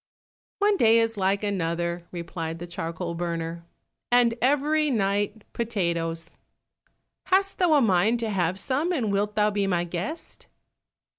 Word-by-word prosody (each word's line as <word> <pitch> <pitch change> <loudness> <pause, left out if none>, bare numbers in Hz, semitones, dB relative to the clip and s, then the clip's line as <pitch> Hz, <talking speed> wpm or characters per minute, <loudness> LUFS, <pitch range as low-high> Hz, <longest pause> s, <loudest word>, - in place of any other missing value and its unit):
"One 410 0 +3
day 225 -5 +5
is 225 0 +2
like 195 +1 0
another," 170 -3 -2
replied 165 -2 -5
the 175 - -7
charcoal 170 0 -4
burner, 170 -1 -4 0.5
"and 240 -1 +5
every 295 +4 +2
night 205 -2 0
potatoes! 170 -7 -2 0.9
Hast 390 +1 +2
thou 350 -4 +4
a 285 - +4
mind 215 +3 +3
to 225 -2 -1
have 180 -2 0
some, 280 - 0
and 245 - 0
wilt 205 +1 0
thou 210 0 +3
be 200 -1 0
my 175 -2 +1
guest?" 180 - -6
200 Hz, 140 wpm, -26 LUFS, 170-235 Hz, 0.9 s, day